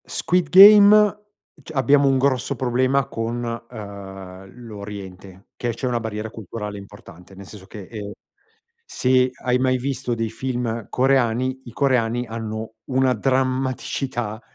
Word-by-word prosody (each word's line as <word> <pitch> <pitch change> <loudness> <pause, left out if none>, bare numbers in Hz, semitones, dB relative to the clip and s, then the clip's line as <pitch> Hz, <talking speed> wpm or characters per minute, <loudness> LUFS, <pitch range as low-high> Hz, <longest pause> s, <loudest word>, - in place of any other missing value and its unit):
"Squid 180 -3 -1
Game" 205 +2 +8 0.5
c - - -11
abbiamo 140 0 +3
un 135 -1 +3
grosso 130 0 0
problema 130 +1 0
con, 115 +2 -4
ehm, 100 -5 -9 0.2
l'Oriente, 100 -3 -10
che 120 -1 -3
c'è 125 - -6
una 120 -1 -1
barriera 110 -1 -5
culturale 105 -1 -7
importante, 100 -2 -14
nel 100 +1 -11
senso 95 -1 -12
che, 105 -3 -10
ehm, 105 0 -8 0.7
se 130 0 +1
hai 125 0 +1
mai 130 0 +1
visto 130 -1 -2
dei 115 -1 -3
film 115 -1 -4
coreani, 130 0 +1
i 120 - -11
coreani 125 -3 0
hanno 110 -1 -6
una 130 -1 +2
drammaticità 130 -2 -2
120 Hz, 130 wpm, -22 LUFS, 105-130 Hz, 0.7 s, Game